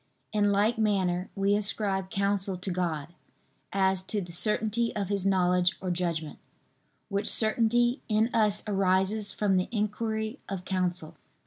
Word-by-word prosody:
In 205 -1 +3
like 210 +3 +2
manner 190 -4 +1
we 200 +1 +2
ascribe 200 -2 -1
counsel 195 -1 -1
to 185 +1 -5
God, 165 -5 -2 0.6
as 190 -1 +2
to 210 - -2
the 175 -3 -6
certainty 220 +5 0
of 200 -3 -2
His 200 -1 0
knowledge 180 -1 +2
or 185 -1 -2
judgment, 170 -3 -2 0.7
which 200 0 0
certainty 240 +3 +2
in 220 +3 +2
us 210 -3 +2
arises 195 +1 +1
from 200 -3 +1
the 185 - 0
inquiry 220 +2 -2
of 190 -2 -5
counsel. 180 -4 -2
195 Hz, 140 wpm, -28 LUFS, 185-215 Hz, 0.7 s, In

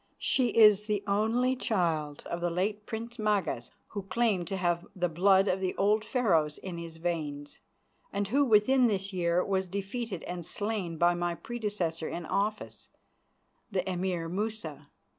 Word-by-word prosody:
She 255 -2 +2
is 210 -2 +6
the 210 -2 0
only 225 +5 +2
child 165 - -1
of 170 - -4
the 175 - +1
late 205 +5 -2
Prince 230 +2 -6
Magas, 195 - 0 0.2
who 205 - -4
claimed 195 -2 0
to 195 - -2
have 175 -1 0
the 180 -1 +1
blood 190 +4 +4
of 185 - +1
the 185 -1 -1
old 210 +2 +2
Pharaohs 170 - +1
in 180 -3 -6
his 165 -1 -8
veins, 155 -4 -4 0.5
and 200 0 -1
who 280 +5 +4
within 250 +2 +5
this 200 -2 -1
year 175 0 +1
was 190 -1 0
defeated 200 +1 -4
and 175 -1 -5
slain 200 -2 -3
by 175 +2 +4
my 175 0 -1
predecessor 205 -8 -3
in 170 - -5
office, 210 +5 -2 0.8
the 190 -2 -1
Emir 180 -2 -1
Musa. 195 -4 -4
190 Hz, 160 wpm, -30 LUFS, 170-215 Hz, 0.8 s, is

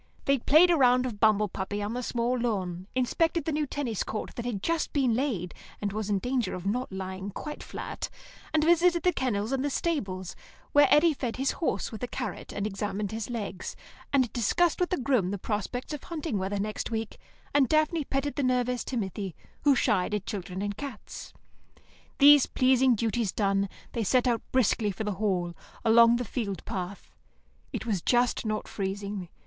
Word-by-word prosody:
They 275 -1 +3
played 320 +8 +6
a 340 - +4
round 250 -2 +4
of 225 -5 -4
bumble 215 -1 +4
puppy 195 +2 -4
on 210 +2 -3
the 250 - -2
small 240 0 0
lawn, 190 -7 -2
inspected 325 +5 +1
the 320 - 0
new 300 0 0
tennis 255 -7 -2
court 215 - -4
that 235 - -5
had 215 -6 -3
just 330 -1 0
been 265 -5 +2
laid, 225 -9 -1 0.3
and 200 -1 -2
was 215 -1 -3
in 205 - +2
danger 245 -1 -1
of 180 0 -7
not 245 +5 -1
lying 190 +1 -5
quite 300 +9 -6
flat, - - -5 0.4
and 310 -1 +2
visited 345 +1 +4
the 360 - +3
kennels 230 -5 -1
and 270 -1 0
the 290 - 0
stables, 195 - -2 0.4
where 290 -1 +6
Eddy 320 +2 +5
fed 250 -4 -3
his 270 +1 0
horse 335 - -2
with 220 - -7
a 245 - -2
carrot - - -5
and 205 - -3
examined 205 0 -3
his 225 +1 -4
legs, 205 -6 -4 0.4
and 260 -4 +2
discussed 305 +9 +2
with 360 - +1
the 365 - 0
groom 250 - +1
the 200 - -2
prospects 215 +8 -3
of 295 - -5
hunting 310 - -3
weather 195 +2 -2
next 210 +1 -3
week, 225 -1 -4 0.3
and 280 -3 +4
Daphne 310 +1 +2
petted 275 +1 -2
the - - +1
nervous 250 -1 +1
Timothy, 195 - -3 0.3
who 285 -2 +6
shied 210 -5 +1
at 205 -1 -3
children 190 -3 -4
and 205 0 -2
cats. 270 -1 -8 0.9
These 290 -1 +8
pleasing 255 -1 +4
duties 225 -2 0
done, 195 -1 +1 0.2
they 230 - -1
set 250 +5 +3
out 235 -2 +1
briskly 230 -4 +2
for 200 +2 -4
the 210 - -1
Hall, 180 -5 0 0.3
along 230 +1 +7
the 245 +1 -2
field 200 -4 -4
path. 190 -2 -5 0.6
It - - -4
was 205 -7 0
just 245 0 +2
not 215 0 -2
freezing. 200 -2 -4
230 Hz, 190 wpm, -28 LUFS, 200-270 Hz, 0.9 s, These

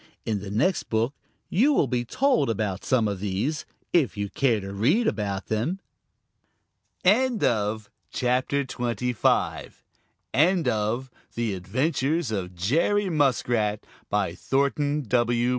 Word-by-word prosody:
In 110 -3 -1
the 100 0 -7
next 125 - 0
book 115 +4 +1 0.3
you 260 - +3
will 210 - +3
be 125 -1 -1
told 255 - +1
about 105 -3 -2
some 120 -4 +2
of 100 -2 -3
these, 105 +10 -2 0.3
if 140 - +2
you 100 -1 -3
care 120 -5 +2
to 100 0 -7
read 145 - +2
about 100 - -1
them. 120 - -1 1.3
End 235 +4 +3
of 110 -2 0 0.2
the - - -7
Project 130 +2 0
Gutenberg 120 -1 -1 1.4
EBook 170 +4 +3
of 115 +5 -1 0.2
The 115 -3 -1
Adventures 130 - -1
of 90 -4 -3
Jerry 170 - +1
Muskrat, 120 -8 +1 0.3
by - - 0
Thornton 145 +2 0
W. 120 0 +1
120 Hz, 130 wpm, -25 LUFS, 105-150 Hz, 1.4 s, you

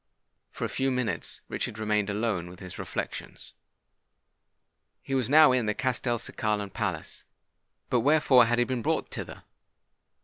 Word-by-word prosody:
For - - -4
a - - -3
few 135 0 0
minutes 125 -9 -2
Richard 105 - -3
remained 105 -1 0
alone 100 -4 -1
with 90 - -12
his 90 -2 -9
reflections. - - -6 1.5
He 135 - -5
was 130 -3 +1
now 155 0 +8
in 125 -3 +1
the 105 - 0
Castelcicalan 115 -5 -1
palace. - - -4 0.7
But 125 - +4
wherefore 140 -2 +5
had 120 +1 +1
he 120 - +3
been 125 -2 -2
brought - - -1
thither? - - -7
120 Hz, 140 wpm, -28 LUFS, 105-130 Hz, 1.5 s, now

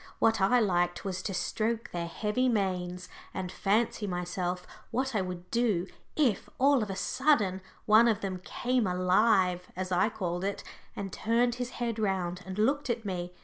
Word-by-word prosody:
What 225 -2 +3
I 245 +6 +5
liked 175 -4 +1
was 185 -1 -2
to 195 - -3
stroke 225 +5 -1
their 170 -1 -3
heavy 215 +8 0
manes 180 -4 -1 0.3
and 185 -2 -3
fancy 210 +2 +1
to - - -3
myself 180 0 -2 0.2
what 265 +1 -1
I 210 - +1
would 180 -1 -6
do 220 -7 +2 0.3
if, 255 -11 +1
all 275 -1 +4
of 210 - -3
a 195 - -3
sudden, 220 -8 +2 0.2
one 220 +2 +6
of 220 -3 +1
them 185 -2 -3
"came 245 -1 0
alive," 180 0 +3
as 185 0 -4
I 185 +4 +3
called 180 -4 -3
it, 200 +1 -2 0.3
and 195 -1 -5
turned 235 +2 +2
his 245 - -2
head 235 -2 -2
round 185 -4 -1
and 190 +1 -5
looked 275 +6 +1
at 230 -2 -1
me. 180 -2 -3
195 Hz, 180 wpm, -30 LUFS, 180-230 Hz, 0.3 s, one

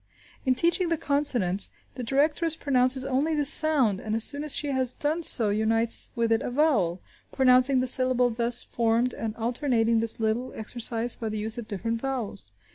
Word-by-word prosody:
In 255 - +2
teaching 340 +5 0
the 330 - -1
consonants, 250 -11 +1 0.2
the 250 - -8
directress 295 +6 -1
pronounces 260 -3 +1
only 275 +4 -1
the 295 -1 -1
sound, 275 -9 +2
and 215 +1 -4
as 225 - +1
soon 285 +4 +1
as 300 - 0
she 295 - -1
has 260 -2 0
done 310 +3 -2
so 230 -9 +3
unites 225 +2 +2
with 230 -1 -1
it 225 - +1
a - - -5
vowel, 245 - 0 0.3
pronouncing 255 0 +4
the - - -2
syllable 255 -1 +3
thus 235 +1 +2
formed 235 +1 -1
and 225 -1 -6
alternating 235 -1 -1
this 230 0 0
little 225 +3 -3
exercise 230 +1 -1
by 225 - -6
the 215 - -5
use 220 +2 -3
of 225 - -9
different 230 +3 -5
vowels. 245 - -6
245 Hz, 185 wpm, -25 LUFS, 225-275 Hz, 0.3 s, pronouncing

